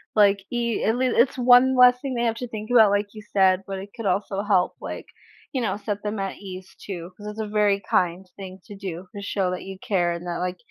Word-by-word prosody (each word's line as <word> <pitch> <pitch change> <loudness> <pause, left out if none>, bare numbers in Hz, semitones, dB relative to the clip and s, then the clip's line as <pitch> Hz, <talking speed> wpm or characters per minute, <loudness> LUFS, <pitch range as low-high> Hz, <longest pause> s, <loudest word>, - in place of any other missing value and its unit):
like, 200 -1 +5
i 235 -2 -1
at 220 +2 +2
least 255 0 +1
it's 255 +2 +3
one 250 +1 +6
less 250 0 +7
thing 275 -2 -3
they 235 - 0
have 230 -1 +1
to 250 - -5
think 220 0 -7
about, 220 -4 +7
like 205 0 +1
you 215 - -9
said, 190 -1 +4
but 195 - -4
it 195 +2 -8
could 225 -4 -4
also 195 +1 -1
help, 200 -3 +2
like, - - -6 0.5
you 260 - -1
know, 200 -4 -1
set 205 0 -4
them 210 0 -3
at 195 -1 -3
ease, 190 -2 -10
too, 175 -3 -6
'cause 210 - -9
it's 210 +1 -7
a 220 - -2
very 205 -1 +2
kind 180 +1 +1
thing 190 -1 -9
to 205 - -10
do 185 -2 -7
to 200 - -6
show 195 -2 -1
that 180 - -4
you 190 0 -8
care 180 -4 0
and 170 +1 -7
that, 175 -1 -3
like, 180 0 -3
205 Hz, 250 wpm, -24 LUFS, 190-225 Hz, 0.5 s, less